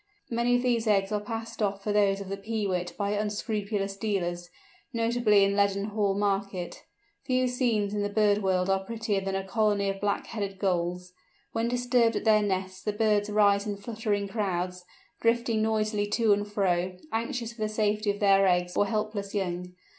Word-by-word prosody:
Many 235 Hz, +1 st, +2 dB
of 245 Hz, -, +1 dB
these 235 Hz, -2 st, +1 dB
eggs 195 Hz, -2 st, +2 dB
are 210 Hz, -, +1 dB
passed 225 Hz, +1 st, -6 dB
off 200 Hz, -1 st, -1 dB
for 210 Hz, -, -1 dB
those 200 Hz, -1 st, +3 dB
of 195 Hz, -, -7 dB
the 195 Hz, -, -2 dB
Peewit 195 Hz, -4 st, -3 dB
by 200 Hz, -1 st, -1 dB
unscrupulous 205 Hz, -1 st, -2 dB
dealers, 175 Hz, -4 st, -2 dB, 0.4 s
notably 230 Hz, -3 st, +3 dB
in 200 Hz, 0 st, +2 dB
Leadenhall 200 Hz, 0 st, +1 dB
market. 195 Hz, -3 st, -2 dB, 0.4 s
Few 255 Hz, -1 st, +1 dB
scenes 235 Hz, -5 st, 0 dB
in 210 Hz, -, -1 dB
the 205 Hz, -, -1 dB
bird 205 Hz, 0 st, +3 dB
world 185 Hz, -2 st, +1 dB
are 195 Hz, 0 st, +1 dB
prettier 220 Hz, -1 st, -2 dB
than 195 Hz, 0 st, -2 dB
a 195 Hz, -, -1 dB
colony 205 Hz, -1 st, +1 dB
of 195 Hz, 0 st, -4 dB
Black 205 Hz, -1 st, 0 dB
headed 200 Hz, -3 st, -4 dB
Gulls. 180 Hz, -1 st, -1 dB, 0.4 s
When 225 Hz, +1 st, 0 dB
disturbed 245 Hz, -1 st, +2 dB
at -, -, -2 dB
their 215 Hz, -1 st, +5 dB
nests 190 Hz, -2 st, -2 dB
the 210 Hz, -, -2 dB
birds 210 Hz, -1 st, +2 dB
rise 205 Hz, -1 st, +3 dB
in 205 Hz, -1 st, -3 dB
fluttering 205 Hz, -1 st, -2 dB
crowds, 180 Hz, -3 st, -2 dB, 0.3 s
drifting 230 Hz, -1 st, +1 dB
noisily 215 Hz, -1 st, 0 dB
to 220 Hz, 0 st, +3 dB
and 205 Hz, 0 st, -2 dB
fro, 185 Hz, -2 st, 0 dB, 0.2 s
anxious 230 Hz, +1 st, -2 dB
for 235 Hz, -, -11 dB
the 215 Hz, -, 0 dB
safety 215 Hz, 0 st, 0 dB
of 205 Hz, 0 st, -1 dB
their 195 Hz, -1 st, +5 dB
eggs 180 Hz, -1 st, +1 dB
or 205 Hz, -, +3 dB
helpless 210 Hz, -1 st, -3 dB
young. 180 Hz, -2 st, -3 dB
205 Hz, 180 wpm, -28 LUFS, 195-220 Hz, 0.4 s, their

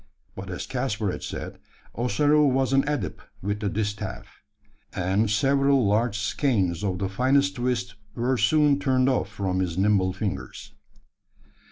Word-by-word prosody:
But 95 Hz, -1 st, -7 dB
as 90 Hz, -, -5 dB
Caspar 115 Hz, -6 st, -2 dB
had -, -, -6 dB
said, -, -, -6 dB, 0.3 s
Ossaroo 145 Hz, +6 st, +3 dB
was 135 Hz, 0 st, +1 dB
an 135 Hz, 0 st, +4 dB
adept 130 Hz, -, -3 dB, 0.2 s
with 105 Hz, +1 st, -2 dB
the 105 Hz, -, -1 dB
distaff; 105 Hz, 0 st, -4 dB, 0.5 s
and 95 Hz, +4 st, 0 dB
several 135 Hz, +4 st, +3 dB
large 105 Hz, +2 st, +1 dB
skeins 105 Hz, -, 0 dB
of 95 Hz, -3 st, -1 dB
the 95 Hz, -, -1 dB
finest 135 Hz, +8 st, +1 dB
twist 120 Hz, -5 st, -1 dB, 0.2 s
were 125 Hz, +2 st, 0 dB
soon 150 Hz, +1 st, +3 dB
turned 130 Hz, -2 st, +2 dB
off 130 Hz, -, 0 dB
from 95 Hz, -2 st, -2 dB
his 90 Hz, -2 st, -2 dB
nimble 95 Hz, -1 st, +2 dB
fingers. 95 Hz, +1 st, -5 dB
110 Hz, 145 wpm, -25 LUFS, 95-135 Hz, 0.5 s, an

